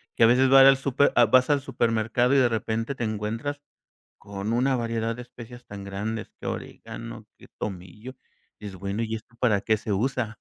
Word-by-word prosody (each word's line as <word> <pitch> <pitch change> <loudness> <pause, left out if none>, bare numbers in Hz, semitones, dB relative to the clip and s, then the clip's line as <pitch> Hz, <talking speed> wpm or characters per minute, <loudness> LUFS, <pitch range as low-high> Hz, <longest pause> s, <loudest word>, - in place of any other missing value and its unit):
que - - +3
a - - +9
veces 130 +3 +4
vas 135 0 +8
al 135 0 +8
súper, 140 +1 +2
ah, 120 - +6
vas 130 +4 +4
al 145 -1 +3
supermercado 115 0 0
y - - +5
de 130 -3 +4
repente 115 +3 -2
te 120 - -4
encuentras, 110 +7 -3 0.6
con 100 +1 -5
una 130 +3 +2
variedad 115 -1 -2
de 125 - -7
especias 120 0 -12
tan 100 -1 -9
grandes, 105 +3 -5
que - - -7
orégano, - - -7
que - - -16
tomillo, 100 +6 -7 0.4
dices: 100 -3 -8
"Bueno, 100 +4 -3
¿y 110 0 -3
esto 115 +2 -14
para 110 -5 +2
qué 110 +1 +1
se 110 0 -4
usa?", 115 +1 -1
115 Hz, 195 wpm, -25 LUFS, 105-125 Hz, 0.6 s, a